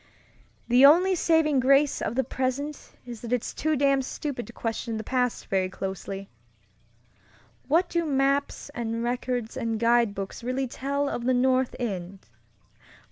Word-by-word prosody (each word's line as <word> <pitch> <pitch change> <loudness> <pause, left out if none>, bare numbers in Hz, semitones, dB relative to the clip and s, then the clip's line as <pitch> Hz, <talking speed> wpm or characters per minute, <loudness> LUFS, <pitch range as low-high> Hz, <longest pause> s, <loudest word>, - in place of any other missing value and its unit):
"The 250 +2 +5
only 350 +7 +7
saving 320 -5 +3
grace 275 +3 +3
of 235 - -2
the 265 - +2
present 265 +4 -3
is 240 -3 -8
that 235 - -7
it's 250 -2 -1
too 310 0 0
damned 275 -1 +2
stupid 265 -2 -5
to - - -10
question 225 0 -3
the 220 - -5
past 250 0 -1
very 190 -1 0
closely. 195 +1 -5 1.4
What 335 +6 +3
do 340 -1 0
maps 280 -1 0
and 230 -4 -3
records 245 -1 -2
and 230 -3 -2
guidebooks 230 -3 +1
really 255 +2 -1
tell 280 +3 -2
of 240 -3 -3
the 255 0 +3
North 255 0 +2
End? 195 -5 -4
255 Hz, 145 wpm, -26 LUFS, 230-280 Hz, 1.4 s, only